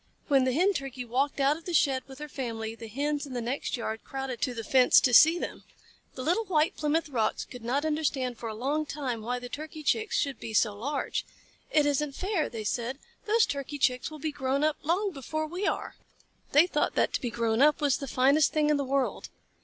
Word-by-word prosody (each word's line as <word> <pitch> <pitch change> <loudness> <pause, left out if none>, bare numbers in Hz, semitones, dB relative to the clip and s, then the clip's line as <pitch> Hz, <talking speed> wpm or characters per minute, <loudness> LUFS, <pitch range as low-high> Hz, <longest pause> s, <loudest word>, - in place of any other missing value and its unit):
When 270 -2 +4
the 260 - +2
Hen 365 +9 +3
Turkey 270 -5 -5
walked 270 +5 -1
out 280 +2 +3
of 325 - -15
the 350 - -2
shed 270 -3 +3
with 265 -1 -11
her 300 - -7
family, 230 -5 -4
the 230 0 -9
Hens 290 +5 -2
in 265 - -8
the 245 - -2
next 250 +3 -2
yard 220 -1 -4
crowded 270 -3 -5
to 250 -2 -1
the 225 - -4
fence 255 +3 +6
to 250 - +1
see 320 +8 +8
them. - - -5 0.5
The 255 - -5
little 360 +10 +1
White 320 -4 +1
Plymouth 305 +2 0
Rocks 230 -6 -1
could 250 -2 -11
not 270 +6 0
understand 280 -6 -1
for 230 - -4
a 215 - -5
long 290 +6 -1
time 260 -7 -3
why 245 +3 -2
the 245 0 -7
Turkey 310 +3 -7
Chicks 440 +8 +1
should 275 -4 -1
be 220 - -6
so 210 -1 +3
large. 275 +7 -2 0.5
"It 300 -1 +3
isn't 290 0 0
fair," 380 -4 -1
they 225 -2 -6
said. 240 +4 -2 0.3
"Those 445 +2 +4
Turkey 280 +1 -4
Chicks 250 -2 +1
will 310 - -9
be 310 +1 -3
grown 275 0 -1
up 310 -1 +2
long 380 +6 0
before 310 +1 -4
we 355 +6 -3
are!" - - -2 0.6
They 295 +4 +6
thought 300 -4 -1
that - - +2
to - - -1
be 245 - -2
grown 230 0 0
up 300 +2 +5
was 290 -3 +2
the 275 - -6
finest 275 +4 +3
thing 300 -1 +2
in 300 - +3
the 280 - -1
world. 270 0 -1
275 Hz, 230 wpm, -28 LUFS, 250-305 Hz, 0.6 s, see